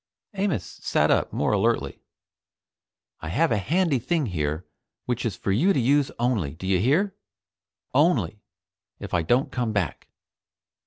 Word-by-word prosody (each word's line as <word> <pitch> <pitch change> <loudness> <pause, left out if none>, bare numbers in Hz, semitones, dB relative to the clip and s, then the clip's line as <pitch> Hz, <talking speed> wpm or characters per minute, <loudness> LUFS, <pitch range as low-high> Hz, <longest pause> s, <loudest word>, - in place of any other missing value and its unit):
Amos 190 - -1
sat - - 0
up - - +2
more - - 0
alertly. - - 0 1.2
"I 80 - -7
have 160 - +2
a 105 - +2
handy 160 - +1
thing 150 +5 0
here 80 -4 -2 0.4
which 120 -1 -1
is 105 - -3
for 95 - -2
you 170 - +3
to - - +1
use 140 +3 +3
only 110 - 0
do 90 - -9
you 95 -1 +2
hear? 160 - +2 0.8
only 130 - +2 0.6
if 100 - -8
I 90 - +3
don't 120 - +1
come 120 -4 -1
back." 100 -6 -2
120 Hz, 150 wpm, -25 LUFS, 95-145 Hz, 1.2 s, you